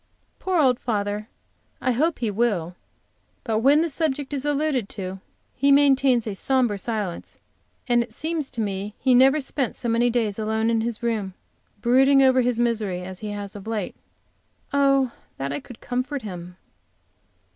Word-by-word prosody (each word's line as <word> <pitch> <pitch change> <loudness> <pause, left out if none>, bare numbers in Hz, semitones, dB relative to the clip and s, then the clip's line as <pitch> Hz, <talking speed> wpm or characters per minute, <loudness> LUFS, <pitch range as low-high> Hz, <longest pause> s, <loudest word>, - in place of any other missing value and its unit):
Poor 370 -2 0
old 255 -5 +3
father 210 -1 -2 0.5
I 255 - +1
hope 305 +7 +1
he 230 -3 -1
will, 195 -6 0 0.7
but 220 -3 0
when 280 +6 +5
the 335 - +1
subject 290 -2 -2
is 275 0 -3
alluded 290 -6 0
to 190 -1 -6 0.3
he 280 +2 +2
maintains 270 -4 +4
a 215 - -3
sombre 240 -1 +1
silence, 210 -5 -4 0.5
and 240 -1 +3
it 235 - -5
seems 310 +3 -3
to 235 - -4
me 200 0 -3
he 260 - +2
never 265 +4 +6
spent 270 -3 -2
so 240 - -4
many 235 +1 +3
days 225 -4 -1
alone 220 +1 0
in 225 -1 +1
his 235 +1 -3
room, 210 -5 -2 0.5
brooding 270 +3 +5
over 260 -1 +5
his 245 -1 0
misery, 215 -6 0
as 185 0 -7
he 215 - -5
has 205 -1 -6
of 205 +1 -9
late. 215 -4 -3 0.8
Oh, 275 -2 +3 0.3
that 140 +1 -3
I 145 - -2
could 245 - -13
comfort 255 +2 -3
him. 180 -3 -8
235 Hz, 165 wpm, -24 LUFS, 210-270 Hz, 0.8 s, never